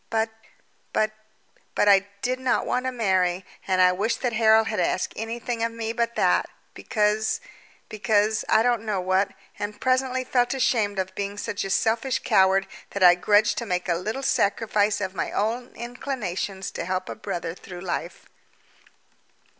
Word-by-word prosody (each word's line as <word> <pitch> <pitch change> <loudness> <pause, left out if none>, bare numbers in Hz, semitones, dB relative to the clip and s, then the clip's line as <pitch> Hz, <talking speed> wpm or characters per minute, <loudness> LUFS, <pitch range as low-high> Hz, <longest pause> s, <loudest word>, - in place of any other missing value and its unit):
But, 225 0 0 0.6
but, 215 0 +2 0.6
but, 205 - +3
I 200 -1 +5 0.2
did 255 +1 0
not 260 -1 +1
want 255 +1 -1
to - - 0
marry, 190 -6 +1 0.2
and 185 -1 +1
I 180 0 +6
wished 215 +6 -1
that 245 -2 0
Harold 220 0 +5
had 215 -3 -2
asked 180 +1 0
anything 230 +1 -4
of 230 - 0
me 230 0 -4
but 235 0 -1
that, - - +2 0.2
because 215 0 0 0.5
because, 210 +1 +1
I 220 - +5
don't 240 -2 +1
know 210 -3 -1
what, 185 +2 +1 0.3
and 205 0 -4
presently 255 0 +1
felt 245 0 +1
ashamed 220 -6 +1
for 190 - +1
being 200 +1 -4
such 205 0 -3
a 195 - -4
selfish 230 +6 +1
coward 190 0 +4 0.2
that 200 - -2
I 175 -1 +9
grudged 205 +4 +3
to 235 - -5
make 180 -1 -1
a 175 - +2
little 215 +10 -3
sacrifice 210 -3 +1
of 190 -1 -3
my 170 - -3
own 235 +4 -1
inclinations 215 -6 -4
to - - -5
help 185 0 -2
a - - -4
brother 165 -1 -4
through 180 0 -10
life. 175 -1 -4
210 Hz, 170 wpm, -25 LUFS, 190-235 Hz, 0.6 s, I